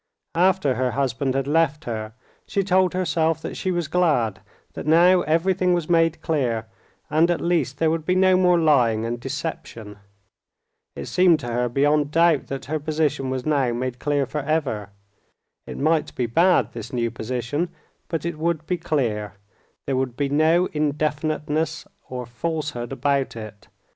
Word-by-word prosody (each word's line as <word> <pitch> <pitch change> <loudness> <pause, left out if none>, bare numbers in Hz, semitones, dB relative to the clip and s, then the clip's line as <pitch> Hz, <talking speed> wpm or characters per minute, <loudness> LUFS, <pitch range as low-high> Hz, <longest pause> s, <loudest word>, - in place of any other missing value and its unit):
After 180 -4 +2
her 130 0 0
husband 135 0 -1
had 135 -1 0
left 150 0 +1
her, 110 -2 -4 0.3
she 200 - 0
told 185 -1 +2
herself 160 -3 +1
that - - -5
she 185 - -3
was 175 -4 -1
glad, 150 - +1 0.3
that - - -7
now 175 +3 +5
everything 180 +3 +2
was 175 -1 -2
made 165 -1 +2
clear, 125 -9 0 0.5
and 160 +3 +3
at 175 - +1
least 160 -6 0
there 160 0 +2
would 165 -1 -1
be 180 +3 +1
no 185 0 +4
more 180 -1 +4
lying 125 -9 +3
and 120 +1 -3
deception. 125 -6 -6 1.0
It - - -6
seemed 180 -3 +4
to 120 -1 -4
her 125 +1 0
beyond 145 +3 +2
doubt 165 -1 +3
that 135 -1 -5
her 155 +3 -2
position 150 -3 -1
was 130 -1 -3
now 140 -5 +1
made 125 0 -3
clear 145 -1 0
forever. 140 -8 -2 0.8
It - - -7
might 155 +2 0
be 125 - 0
bad, 130 - +3
this 115 +1 -8
new 120 -3 -1
position, 125 +8 -3 0.4
but 165 -2 -3
it 170 -2 -4
would 160 -1 -1
be 180 +2 -1
clear; 115 -11 -1 0.5
there 135 - -1
would 130 -2 -2
be 140 -1 0
no 160 +5 +3
indefiniteness 155 +1 -1 0.2
or 125 -1 -5
falsehood 140 0 -4
about 140 -1 0
it. 110 -2 -9
150 Hz, 165 wpm, -23 LUFS, 125-165 Hz, 1.0 s, now